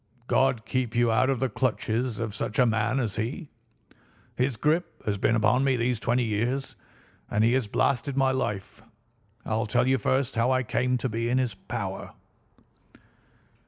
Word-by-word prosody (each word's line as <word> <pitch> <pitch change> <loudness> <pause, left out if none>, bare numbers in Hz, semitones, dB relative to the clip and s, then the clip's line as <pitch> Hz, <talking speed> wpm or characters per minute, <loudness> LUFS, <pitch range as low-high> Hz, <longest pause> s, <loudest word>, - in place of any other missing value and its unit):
God 130 -3 +2
keep 125 -3 -2
you 120 -1 +3
out 110 +4 +3
of 135 -3 0
the 130 - +1
clutches 125 -2 -1
of 110 -3 -3
such 105 - -3
a 125 - +5
man 115 +3 +1
as 115 -5 -2
he. 125 - -4 0.8
His 125 -1 0
grip 160 +7 0
has 100 -2 -1
been 115 - +2
upon 110 +4 +3
me 135 -1 +3
these 120 -1 0
twenty 120 +2 +1
years, 120 +5 -1 0.5
and 105 - +1
he 115 +2 +4
has 130 -4 +1
blasted 135 +5 0
my 135 -1 +3
life. 105 -6 -3 0.6
I'll 110 0 -1
tell 105 - +2
you 130 0 +3
first 130 0 0
how 115 +2 +2
I 130 0 +2
came 125 +2 0
to 125 - -2
be 115 0 -2
in 125 - +2
his 125 -4 0
power. 100 - -6
120 Hz, 175 wpm, -27 LUFS, 110-130 Hz, 0.8 s, a